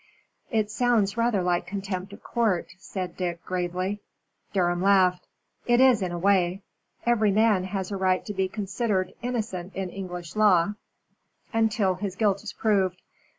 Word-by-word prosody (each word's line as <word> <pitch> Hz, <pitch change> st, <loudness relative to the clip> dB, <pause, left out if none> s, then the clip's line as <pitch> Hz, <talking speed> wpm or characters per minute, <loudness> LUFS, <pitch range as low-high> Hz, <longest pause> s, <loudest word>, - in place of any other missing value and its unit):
"It 215 Hz, -3 st, 0 dB
sounds 225 Hz, -5 st, +2 dB
rather 230 Hz, -5 st, +1 dB
like 175 Hz, -1 st, 0 dB
contempt 195 Hz, -1 st, -4 dB
of 205 Hz, -, -12 dB
court," 220 Hz, -7 st, 0 dB
said 185 Hz, -2 st, -5 dB
Dick, 175 Hz, -2 st, -4 dB
gravely. 185 Hz, +3 st, -2 dB, 0.5 s
Durham 175 Hz, -2 st, +1 dB
laughed. 185 Hz, -2 st, +3 dB, 0.4 s
"It 240 Hz, 0 st, +4 dB
is, 255 Hz, -5 st, +6 dB
in 185 Hz, -2 st, -1 dB
a 175 Hz, -, -3 dB
way. 190 Hz, 0 st, +2 dB, 0.4 s
Every 230 Hz, -3 st, +3 dB
man 210 Hz, -2 st, +3 dB
has 190 Hz, 0 st, -4 dB
a 200 Hz, -, -2 dB
right 185 Hz, -1 st, +1 dB
to 210 Hz, -, -4 dB
be 190 Hz, -1 st, 0 dB
considered 195 Hz, -1 st, -2 dB
innocent 215 Hz, -7 st, -3 dB
in 190 Hz, -2 st, -3 dB
English 180 Hz, -3 st, -7 dB
law 205 Hz, -3 st, +4 dB, 0.8 s
until 220 Hz, -4 st, +2 dB
his 190 Hz, 0 st, -4 dB
guilt 200 Hz, -2 st, +1 dB
is 215 Hz, -, -5 dB
proved. 190 Hz, -4 st, +1 dB
195 Hz, 150 wpm, -26 LUFS, 185-215 Hz, 0.8 s, is